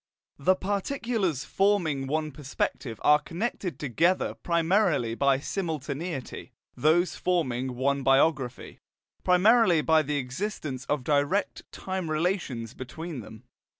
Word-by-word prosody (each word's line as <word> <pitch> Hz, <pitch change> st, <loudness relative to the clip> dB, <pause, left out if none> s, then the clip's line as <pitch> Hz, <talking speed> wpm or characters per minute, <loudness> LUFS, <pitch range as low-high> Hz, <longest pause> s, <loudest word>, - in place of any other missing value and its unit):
The 185 Hz, +7 st, +3 dB
particulars 200 Hz, -, -1 dB
forming 175 Hz, -9 st, +1 dB
one 155 Hz, +2 st, -1 dB
perspective 130 Hz, -4 st, -4 dB
are 150 Hz, 0 st, +6 dB
connected 180 Hz, -, -4 dB
together 165 Hz, +7 st, +1 dB
primarily 170 Hz, -, +1 dB
by 135 Hz, +2 st, +2 dB
simultaneity; 155 Hz, -3 st, -4 dB, 0.2 s
those 170 Hz, +4 st, +2 dB
forming 130 Hz, -8 st, -1 dB
one 140 Hz, +2 st, 0 dB
biography, 135 Hz, -1 st, +1 dB, 0.4 s
primarily 180 Hz, -2 st, +5 dB
by 160 Hz, -1 st, +4 dB
the 145 Hz, 0 st, -2 dB
existence 135 Hz, 0 st, -4 dB
of 145 Hz, -3 st, -1 dB
direct 145 Hz, +8 st, 0 dB
time 185 Hz, -3 st, -4 dB
relations 155 Hz, -, -1 dB
between 155 Hz, +4 st, -7 dB
them. 110 Hz, +1 st, -11 dB
155 Hz, 110 wpm, -27 LUFS, 135-180 Hz, 0.4 s, are